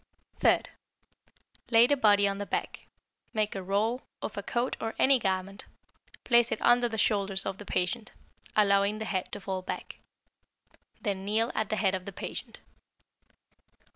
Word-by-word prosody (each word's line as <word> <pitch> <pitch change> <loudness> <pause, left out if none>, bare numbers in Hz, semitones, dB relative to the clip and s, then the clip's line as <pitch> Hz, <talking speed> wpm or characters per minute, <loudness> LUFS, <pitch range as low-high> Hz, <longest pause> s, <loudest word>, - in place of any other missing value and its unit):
Third - - +3 1.0
Lay 230 0 +7
the 285 +3 +3
body 205 -5 +4
on 200 0 -2
the 205 - -4
back, - - -4 0.5
make 215 -1 0
a 195 - -4
roll 210 +7 0 0.2
of - - -5
a - - -3
coat 245 +1 -1
or 225 0 -3
any 265 -1 +5
garment, 190 -1 -2 0.6
place 235 -1 +4
it - - -1
under 240 0 +4
the 225 - -4
shoulders 200 -3 +1
of 195 -1 -4
the 205 - -9
patient, 185 +5 -1 0.4
allowing 200 0 +3
the 220 - -4
head 190 -4 -2
to - - -5
fall 190 -1 -4
back. 185 - -6 1.0
Then 195 -4 -3
kneel 220 +4 +1
at 220 -2 -1
the - - 0
head 195 -3 +1
of 185 -1 -3
the 200 - -6
patient. - - -7
205 Hz, 165 wpm, -29 LUFS, 195-225 Hz, 1.0 s, Lay